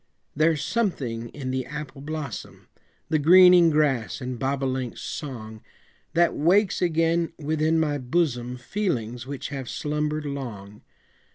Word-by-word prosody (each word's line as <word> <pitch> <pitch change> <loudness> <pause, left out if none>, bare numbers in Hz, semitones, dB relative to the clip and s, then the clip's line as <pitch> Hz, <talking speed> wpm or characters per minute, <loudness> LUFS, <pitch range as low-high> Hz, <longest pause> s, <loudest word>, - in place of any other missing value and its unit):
There's 155 -1 +2
something 140 - -2
in 130 -1 -5
the 130 -1 -2
apple 150 -1 -7
blossom, 150 -5 -6 0.4
The 155 -1 +2
greening 180 +2 +7
grass 145 -7 +1
and 125 -2 -5
bobolink's 130 -2 -2
song, 110 -7 -6 0.5
That 170 0 +4
wakes 190 +6 +2
again 165 -1 +1
within 155 +1 +1
my 150 -2 0
bosom 125 -3 -1
Feelings 125 - -3
which 140 -1 -5
have 135 -4 -5
slumbered 150 0 -2
long. 110 -8 -6
145 Hz, 120 wpm, -25 LUFS, 125-160 Hz, 0.5 s, greening